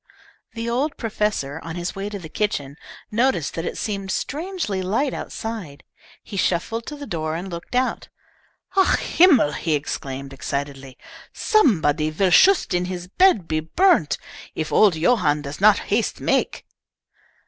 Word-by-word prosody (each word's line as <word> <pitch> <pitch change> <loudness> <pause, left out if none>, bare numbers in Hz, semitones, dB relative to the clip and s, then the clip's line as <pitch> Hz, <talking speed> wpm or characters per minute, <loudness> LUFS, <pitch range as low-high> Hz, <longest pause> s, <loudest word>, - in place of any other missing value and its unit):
The 230 +1 -4
old 265 +6 -1
professor, 210 - -2
on 165 0 -6
his 175 0 -4
way 195 +1 -4
to 205 - -5
the 175 -5 -9
kitchen, 150 -6 -2 0.4
noticed 230 - +1
that 165 - -4
it - - -4
seemed 195 -2 -3
strangely 305 - -3
light 225 +10 0
outside. 210 -11 -6 0.4
He 205 - -8
shuffled 225 +6 -1
to 300 - -5
the 290 -1 -8
door 155 - -3
and 180 +3 -5
looked 170 +8 -7
out. 255 +1 0 0.7
"Ach 385 -1 +4
Himmel!" 305 - +4
he 155 +1 -1
exclaimed, 140 -1 -5
excitedly. 135 -1 -5 0.4
"Somebody 160 - +2
vill 180 +4 +1
shust 390 - +5
in 180 0 +1
his 180 -1 -6
bed 220 - +3
be 155 - 0
burnt, 300 - +2 0.4
if 155 -1 -3
old 205 -5 +5
Johann 160 -5 +2
does 140 +4 -7
not 210 0 +7 0.2
haste - - 0
make!" - - 0
185 Hz, 150 wpm, -22 LUFS, 155-235 Hz, 0.7 s, not